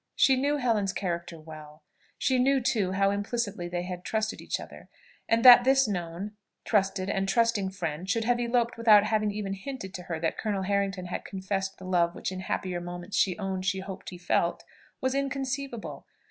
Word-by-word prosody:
She 265 - +5
knew 285 +3 +1
Helen's 220 -7 +1
character 170 -3 -4
well, 155 -1 -12 0.3
she 260 -1 +1
knew 270 +2 +3
too 215 -7 0
how 195 +1 +2
implicitly 205 -2 -2
they 175 0 -3
had 180 0 -6
trusted 220 +1 -2
each - - -3
other; - - -11 0.4
and 230 +2 +2
that 245 -1 +11
this 270 0 +4
known, 180 0 -4 0.3
trusted 195 -3 +1
and 195 -1 -1
trusting 230 -2 +2
friend 180 -2 -4
should 230 +1 +1
have 240 +1 +1
eloped 240 0 0
without 215 -3 +7
having 215 0 +1
even 200 -1 -3
hinted 195 -1 -7
to 180 - -6
her 165 -2 -2
that 165 0 -2
Colonel 205 -3 -1
Harrington 195 -1 -1
had 180 - -4
confessed 195 0 -3
the 185 - -11
love 175 -2 +1
which - - -4
in 185 - -5
happier 185 -1 -3
moments 175 +2 -6
she 185 -3 +2
owned 190 -2 -3
she 190 0 0
hoped 190 0 -8
he 180 - -9
felt, 175 -1 0 0.4
was 260 0 0
inconceivable! 275 -3 -3
195 Hz, 190 wpm, -28 LUFS, 185-230 Hz, 0.4 s, that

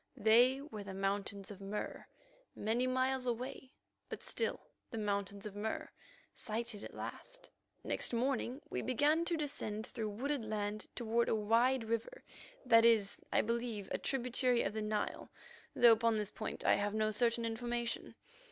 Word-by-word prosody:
They 245 +5 +5
were 250 -8 -7
the 195 -1 -7
Mountains 195 0 -2
of 200 -1 -10
Mur 200 +2 -5 0.5
many 230 +4 0
miles 260 0 +1
away, 255 +2 -3 0.4
but - - -6
still 460 - -1 0.3
the 225 - -5
Mountains 200 -1 -2
of 205 -1 -6
Mur, 215 +2 -3 0.4
sighted 225 -1 -4
at - - -8
last. - - -8 0.3
Next - - 0
morning 255 +2 0
we - - -3
began 295 +6 +2
to 340 -1 0
descend 220 -8 -3
through 220 -2 -4
wooded 265 +5 -2
land 215 -1 -3
toward 235 0 +1
a - - +3
wide 230 +4 +3
river 230 - -3 0.4
that 230 -2 +7
is, 225 -4 +4
I - - +4
believe, 230 -3 -2
a - - -1
tributary 250 -1 +2
of 195 - -1
the 220 - -2
Nile, 210 0 -2 0.5
though 240 -1 +8
upon 225 0 +3
this 210 -1 -2
point 215 - -5
I - - +6
have 205 +1 -1
no 215 0 +2
certain 235 +1 +2
information. 235 +1 -3
230 Hz, 160 wpm, -35 LUFS, 210-250 Hz, 0.5 s, though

